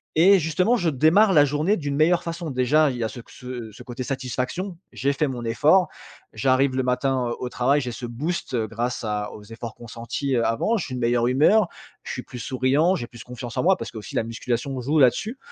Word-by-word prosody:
et 190 +4 +6
justement 180 +9 +1
je 175 -7 +1
démarre 160 +9 +4
la 145 -3 +6
journée 150 +8 +1
d'une 145 -3 -3
meilleure 175 +3 +3
façon. 170 -2 -5
Déjà 140 +4 +3
il 125 - -6
y 120 - -2
a - - 0
ce 125 - -9
c - - -24
ce 125 -3 -8
ce - - -12
côté 125 +1 -6
satisfaction, 135 +8 -3 0.2
j'ai 140 +1 0
fait 150 +2 0
mon 125 -3 -5
effort, 155 +10 +4 0.5
j'arrive 130 0 +2
le 130 - +1
matin 125 -1 0
au 125 - -4
travail, 135 +4 +2
j'ai 125 - -4
ce 120 +1 -6
boost 135 +4 -3
grâce 115 +2 -2
à 105 -1 -2
aux 105 - -11
efforts 115 +1 -8
consentis, 120 +4 -4
heu, 115 - +2
avant, 215 - +1
je 190 - -3
suis 130 - -6
de - - -4
meilleure 120 0 +2
humeur, 160 - +4 0.4
je - - -6
suis - - -5
plus 125 - -9
souriant, 135 - +2
j'ai 120 - -4
plus 120 -2 -12
confiance 125 -1 -8
en - - +1
moi 190 +2 +4
parce - - -6
qu'aussi 110 -2 -9
la - - +1
musculation 120 +3 -3
joue 145 +6 0
là-dessus, 145 - +2
130 Hz, 225 wpm, -24 LUFS, 120-155 Hz, 0.5 s, et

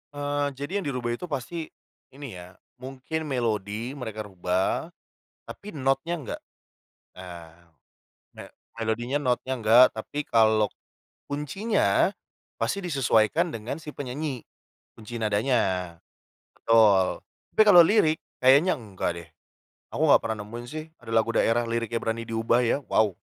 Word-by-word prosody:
Eee, 145 0 -1
jadi 150 +9 -3
yang 190 - -6
dirubah 125 -3 -2
itu 150 +9 -5
pasti 155 +3 -4 0.5
ini 140 -3 -8
ya, 90 +1 -13 0.2
mungkin 135 +4 -5
melodi 115 -2 -2
mereka 110 -6 -6
rubah, 95 - -1 0.6
tapi 205 - -10
notnya 135 +2 -1
enggak, 135 -8 -6 0.8
eee, 85 -2 -11 0.8
ne - - -6 0.4
melodinya, 120 +5 -1
notnya 130 -1 -1
enggak, 115 +3 +7
tapi 145 +7 -5
kalau 110 -3 +3 0.6
kuncinya 150 - +1 0.4
pasti 200 - -1
disesuaikan 150 - +1
dengan 115 +5 -5
si 150 - -7
penyanyi, 140 -1 -5 0.5
kunci 110 +2 -10
nadanya. 105 -5 0 0.6
Betul, 105 -5 +4 0.3
tapi 215 - +5
kalau 180 -5 +9
lirik 160 -4 +3 0.2
kayaknya 140 +8 +5
enggak 100 -7 -3
deh. 85 - -11 0.7
Aku - - +1
nggak - - +7
pernah 110 -2 -3
nemuin 120 +3 -8
sih 155 +2 -6 0.2
ada 115 - -10
lagu 115 +1 +3
daerah 115 +1 +2
liriknya 115 0 -2
berani 115 0 -2
diubah 115 +1 +1
ya, 140 +5 0
wow. 105 -4 +3
120 Hz, 130 wpm, -26 LUFS, 110-145 Hz, 0.8 s, kalau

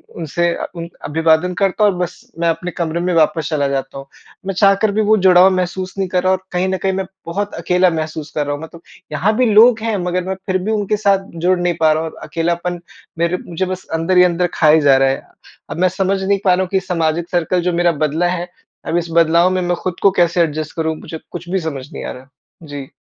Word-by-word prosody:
उनसे 170 +1 -1
अ, - - -4
उनक 170 0 -8
अभिवादन 160 +3 +2
करता 195 +3 0
हूँ 205 - +5
और - - -7
बस 200 +8 -5
मैं 170 - +1
अपने 170 +2 -2
कमरे 170 0 -3
में 180 +1 -1
वापस 160 -1 +2
चला 145 -3 0
जाता 135 0 -3
हूँ। 135 - -8 0.4
मैं 195 - -2
चाहकर 200 +2 +3
भी 215 +2 +1
वो 215 +1 +4
जुड़ाव 185 0 +6
महसूस 185 +1 -3
नहीं 195 -1 -1
कर 180 0 0
रहा 185 - +3
और 185 - 0
कहीं 180 +1 0
न 190 - -1
कहीं 190 0 -1
मैं 190 0 -2 0.2
बहुत 200 +5 -3
अकेला 180 +2 +2
महसूस 155 -2 -4
कर 150 - 0
रहा 145 0 -2
हूँ। 145 - -9
मतलब 165 +1 -11 0.3
यहाँ 190 +9 +1
भी 255 - +3
लोग 225 +2 +6
हैं 225 -1 -1
मगर 180 0 -1
मैं 190 +1 -3
फिर 185 -1 0
भी 215 - -1
उनके 210 -1 0
साथ 200 -2 +2 0.2
जुड़ 185 0 +3
नहीं 175 0 +1
पा 160 -1 +4
रहा 155 - -1
हूँ। 160 - -5
अकेलापन 175 +1 -2 0.4
मेरे 170 +2 +1
मुझे 175 +2 -2
बस 185 0 -5
अंदर 165 +3 +1
ही 180 - +8
अंदर 180 0 +2
खाए 155 0 +5
जा 140 -2 +5
रहा 135 0 +3
है। 135 - -3 0.5
अब - - -5
मैं 185 0 +3
समझ 190 +1 -1
नहीं 200 +1 +1
पा 185 - +5
रहा 185 - +1
हूँ 185 - -2
कि 190 - +1
सामाजिक 170 -2 -1
सर्किल 175 +1 0
जो 180 0 -1
मेरा 175 0 +3
बदला 160 +4 0
है 175 0 -3 0.4
अब 170 - 0
इस 170 0 -1
बदलाव 170 +2 +4
में 185 0 0
मैं 175 0 0
खुद 180 -1 -4
को 200 - +5
कैसे 175 0 +3
एडजस्ट 155 -2 -2
करूँ 160 -1 -1
मुझे 160 +1 -8
कुछ 175 0 -8
भी 190 - 0
समझ 145 -4 -6
नहीं - - -6
आ - - -4
रहा। 130 +2 -12 0.4
जी। 140 -2 -7
175 Hz, 250 wpm, -17 LUFS, 160-185 Hz, 0.5 s, ही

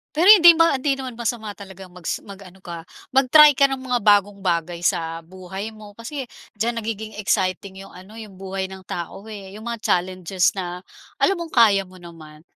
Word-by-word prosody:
Pero 325 +4 +2
hindi 345 -5 +9
ma 330 -2 +4
hindi 275 0 0
naman 260 -2 -6
masama 225 -2 -4
talagang 190 -2 -12
magsi 180 -2 -5
mag-ano 195 -2 -12
ka 170 -1 -7 0.3
mag-try 290 +3 +7
ka 275 +1 +3
ng 270 - -3
mga 250 -2 -2
bagong 205 -1 +3
bagay 170 -2 -2
sa 165 -2 -1
buhay 185 +4 -8
mo 215 -2 -14
kasi, 255 +5 -7 0.3
diyan 230 +2 -1
nagiging 220 0 -5
exciting 190 -1 -1
'yong - - -15
ano, 190 +4 -14
'yong 215 -3 -10
buhay 190 0 -4
ng 190 - -10
tao, 175 +3 -6
eh, 195 -3 -9
'yong 215 +2 -10
mga 235 -2 -5
challenges 185 +2 0
na 180 -1 -5 0.4
alam 390 - +3
mong 335 -1 -7
kaya 210 -5 +5
mo 185 0 -16
naman. 155 -3 -13
200 Hz, 185 wpm, -22 LUFS, 185-235 Hz, 0.4 s, hindi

